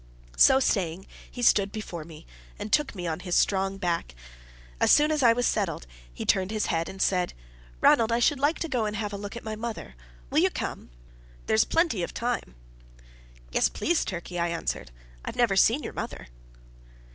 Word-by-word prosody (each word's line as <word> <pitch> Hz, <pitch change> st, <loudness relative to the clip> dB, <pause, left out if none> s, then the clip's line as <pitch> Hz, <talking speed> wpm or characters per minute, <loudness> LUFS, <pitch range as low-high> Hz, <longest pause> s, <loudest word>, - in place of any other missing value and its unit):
So 265 Hz, -, +6 dB
saying 190 Hz, -7 st, 0 dB, 0.2 s
he 245 Hz, -, -6 dB
stooped 200 Hz, -4 st, +4 dB
before 185 Hz, -7 st, -6 dB
me, 160 Hz, 0 st, -13 dB, 0.3 s
and 205 Hz, +1 st, -6 dB
took 295 Hz, -7 st, +2 dB
me 180 Hz, -2 st, -5 dB
on 160 Hz, -1 st, -2 dB
his 180 Hz, -1 st, -2 dB
strong 195 Hz, 0 st, +1 dB
back. 170 Hz, -, -2 dB, 0.6 s
As -, -, +4 dB
soon 300 Hz, +1 st, +5 dB
as 305 Hz, -2 st, +1 dB
I 240 Hz, -3 st, +6 dB
was 245 Hz, +1 st, +1 dB
well -, -, +3 dB
settled, 190 Hz, -, -2 dB, 0.3 s
he -, -, -6 dB
turned 190 Hz, -1 st, +2 dB
his 215 Hz, 0 st, -1 dB
head, 165 Hz, -1 st, -1 dB
and 190 Hz, -, -10 dB
said: 180 Hz, -2 st, +1 dB, 0.5 s
"Ranald, 230 Hz, 0 st, +5 dB
I 230 Hz, -, +3 dB
should 260 Hz, +3 st, +2 dB
like 290 Hz, +4 st, +2 dB
to 330 Hz, -, -1 dB
go 245 Hz, -7 st, -1 dB
and 210 Hz, 0 st, -3 dB
have 205 Hz, -1 st, -3 dB
a -, -, -2 dB
look 200 Hz, +2 st, -7 dB
at 235 Hz, -, -7 dB
my 220 Hz, -1 st, -4 dB
mother. 225 Hz, -, -6 dB, 0.4 s
Will -, -, +3 dB
you -, -, +4 dB
come? -, -, -5 dB, 0.6 s
There's 110 Hz, -, +3 dB
plenty 325 Hz, -, +1 dB
of 170 Hz, -, -4 dB
time." 240 Hz, -, -3 dB, 1.0 s
"Yes, -, -, +2 dB
please, 345 Hz, 0 st, 0 dB
Turkey," 175 Hz, -1 st, -5 dB
I 170 Hz, -, +1 dB
answered. 165 Hz, -, -3 dB, 0.3 s
"I've -, -, -6 dB
never 235 Hz, -5 st, +2 dB
seen 230 Hz, +9 st, +4 dB
your -, -, -6 dB
mother." -, -, -6 dB
205 Hz, 195 wpm, -27 LUFS, 175-235 Hz, 1.0 s, So